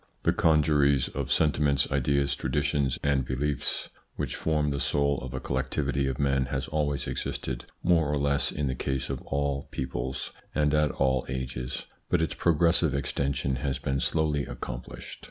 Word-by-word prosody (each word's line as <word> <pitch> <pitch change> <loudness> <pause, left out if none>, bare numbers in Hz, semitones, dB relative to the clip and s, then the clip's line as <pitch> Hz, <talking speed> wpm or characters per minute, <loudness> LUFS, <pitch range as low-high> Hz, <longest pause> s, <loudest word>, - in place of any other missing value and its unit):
The - - +3
congeries 75 -4 +3
of - - -4
sentiments, 75 -2 +3
ideas, 70 0 +2
traditions, 70 0 0
and 70 -2 +2
beliefs 65 +3 -1 0.3
which - - -2
form 75 -2 +1
the 70 - -1
soul 70 -1 +1
of 65 0 -6
a - - -2
collectivity 70 +1 -1
of 65 -1 -2
men 70 -2 +2
has 65 +1 -2
always 75 -2 0
existed 65 -2 -3 0.2
more 85 -3 +4
or 75 - +1
less 70 0 +1
in 75 - -2
the 65 - 0
case 65 +1 -2
of 65 - -4
all 70 0 -1
peoples 65 0 -3 0.2
and 75 -1 +2
at 75 -1 +4
all 65 -2 +1
ages, 65 -1 -4 0.2
but 90 - +3
its 80 - 0
progressive 85 -2 +3
extension 70 -1 -1
has 70 -1 -1
been 70 +1 -1
slowly 75 -1 +1
accomplished. - - -7
70 Hz, 160 wpm, -28 LUFS, 65-75 Hz, 0.3 s, more